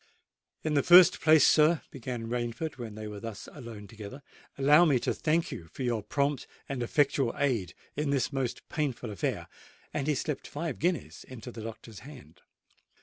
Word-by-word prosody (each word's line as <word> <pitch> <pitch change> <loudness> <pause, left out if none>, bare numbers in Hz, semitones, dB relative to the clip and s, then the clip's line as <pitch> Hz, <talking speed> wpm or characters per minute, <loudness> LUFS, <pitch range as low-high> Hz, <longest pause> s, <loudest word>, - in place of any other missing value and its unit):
"In 155 - -1
the 145 - +4
first 175 +4 +7
place, 155 -2 +6
sir," 155 +1 +4
began 125 -3 -5
Rainford 120 +6 -3
when 115 -3 -6
they 110 0 -7
were 105 -1 -7
thus 110 -1 -7
alone 115 -7 -9
together, 110 +6 -10 0.3
"allow 145 +4 +6
me 150 -6 +4
to - - -1
thank 165 +1 0
you 85 - -7
for 130 - -7
your 120 -3 0
prompt 140 +6 -1 0.2
and 135 -3 -3
effectual 135 0 +1
aid 120 -10 0 0.2
in 150 0 -1
this 140 0 0
most 130 -3 -3
painful 130 -7 -3
affair;"—and 135 +7 -5
he 150 - +2
slipped 150 +1 -3
five 155 -1 -4
guineas 175 -2 -1
into 125 -1 -9
the 115 - -8
doctor's 110 -1 -9
hand. 125 - -13
130 Hz, 170 wpm, -29 LUFS, 115-150 Hz, 0.3 s, first